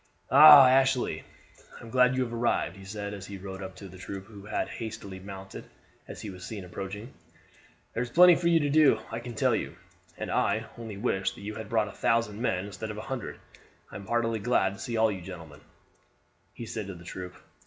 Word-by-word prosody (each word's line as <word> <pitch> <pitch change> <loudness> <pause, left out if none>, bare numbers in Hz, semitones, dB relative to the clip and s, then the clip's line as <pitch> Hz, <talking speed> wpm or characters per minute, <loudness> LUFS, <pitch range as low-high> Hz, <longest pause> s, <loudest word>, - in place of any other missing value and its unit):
"Ah! 150 -3 +10
Ashley, 130 -1 +2 0.6
I - - -13
am 115 - -10
glad 125 0 +4
you 130 - +1
have 120 -2 -6
arrived," 115 -6 0
he 95 0 -12
said, 100 0 -5
as 100 -2 -8
he 100 - -7
rode 95 0 -8
up 95 -1 -7
to 100 - -10
the 95 0 -13
troop, 95 +1 -7
who 100 -1 -13
had 105 - -2
hastily 110 -4 -7
mounted 95 0 -9 0.4
as - - -9
he 105 - -6
was 90 -1 -11
seen 100 -3 -7
approaching. 100 +6 -7 0.8
"There 115 - -2
is 125 - -3
plenty 180 +6 +8
for 170 0 0
you 170 -1 +5
to 145 - 0
do, 155 -1 +5
I 115 - -3
can 120 0 -8
tell - - +2
you; - - -4 0.4
and - - -5
I 110 +1 +1
only 115 -4 -8
wish 100 -3 -1
that - - -12
you 105 +2 -5
had 110 -1 -8
brought 110 -2 +1
a - - -8
thousand 115 -2 0
men 95 -6 0
instead 100 +2 -7
of 105 - -6
a - - -5
hundred. 125 - -6 0.5
I - - -11
am 100 0 -8
heartily 115 0 0
glad 100 -4 +1
to 100 - -12
see 120 - -5
you 115 - 0
all, 110 -1 +4
gentlemen," 85 -5 -10 0.9
he 120 - -7
said 110 -2 -5
to 95 - -7
the 85 0 -13
troop. 90 0 -7
105 Hz, 225 wpm, -28 LUFS, 95-120 Hz, 0.9 s, Ah